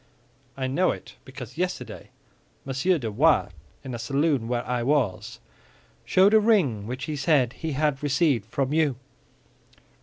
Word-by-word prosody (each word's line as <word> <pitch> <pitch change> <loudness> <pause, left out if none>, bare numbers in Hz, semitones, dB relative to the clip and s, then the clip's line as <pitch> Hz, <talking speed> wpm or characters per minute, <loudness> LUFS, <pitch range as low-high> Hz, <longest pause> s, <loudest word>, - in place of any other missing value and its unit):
"I 130 - -2
know 155 +8 +1
it - - -5
because 130 +2 -10
yesterday 180 0 -4 0.6
Monsieur 135 +7 +1
de 115 -7 -4
Wardes, 145 - +3 0.3
in 130 -2 -6
a 120 - -5
saloon 135 0 0
where 120 0 -2
I 125 -1 -1
was, 115 -5 -1 0.7
showed 195 +3 +4
a 220 - +7
ring 165 - +2
which 125 +2 -5
he 150 +2 -3
said 135 -3 +2
he 160 -2 -4
had 145 -1 0
received 140 - +1
from 135 +4 -2
you." 155 -4 +2
135 Hz, 150 wpm, -25 LUFS, 125-155 Hz, 0.7 s, a